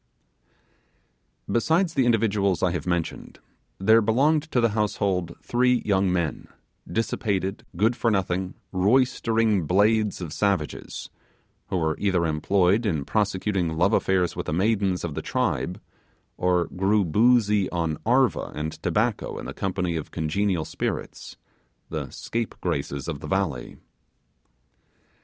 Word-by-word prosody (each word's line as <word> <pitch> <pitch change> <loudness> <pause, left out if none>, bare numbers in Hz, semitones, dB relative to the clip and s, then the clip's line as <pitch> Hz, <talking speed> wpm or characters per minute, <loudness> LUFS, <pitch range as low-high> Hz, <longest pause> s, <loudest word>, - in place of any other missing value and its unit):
Besides 160 +8 +1
the 130 -5 +2
individuals 100 -6 +1
I 90 - +3
have 85 +1 -4
mentioned, 85 -2 -3 0.4
there 110 +4 +5
belonged 145 +8 +2
to 125 - +2
the 115 -1 +3
household 100 -5 -1
three 125 0 +2
young 95 -2 +2
men, 85 -4 -2 0.4
dissipated, 100 -3 -2
good 110 +6 +3
for 115 - +1
nothing, 95 -2 -1 0.2
roystering 110 - +2
blades 105 +3 +2
of 85 -4 -6
savages, 100 -7 -2 0.6
who 95 - -1
were 80 -2 0
either 95 -4 +1
employed 90 +7 +2
in 80 -8 -1
prosecuting 95 -5 0
love 100 +6 +3
affairs 95 -4 +1
with - - -5
the - - -1
maidens 95 0 +1
of 85 -3 -3
the - - -4
tribe, 90 +2 -1 0.6
or 90 -1 +1
grew 100 +2 +1
boozy 105 +1 +3
on 85 -3 -2
'arva' 120 - +2
and 75 +1 -5
tobacco - - 0
in - - -7
the - - -6
company 90 -3 -2
of 80 - -6
congenial 85 +1 -1
spirits, - - -5 0.5
the - - -4
scapegraces 70 -11 -3
of 80 -4 -4
the - - -8
valley. 95 -10 -2
95 Hz, 130 wpm, -25 LUFS, 85-110 Hz, 0.6 s, there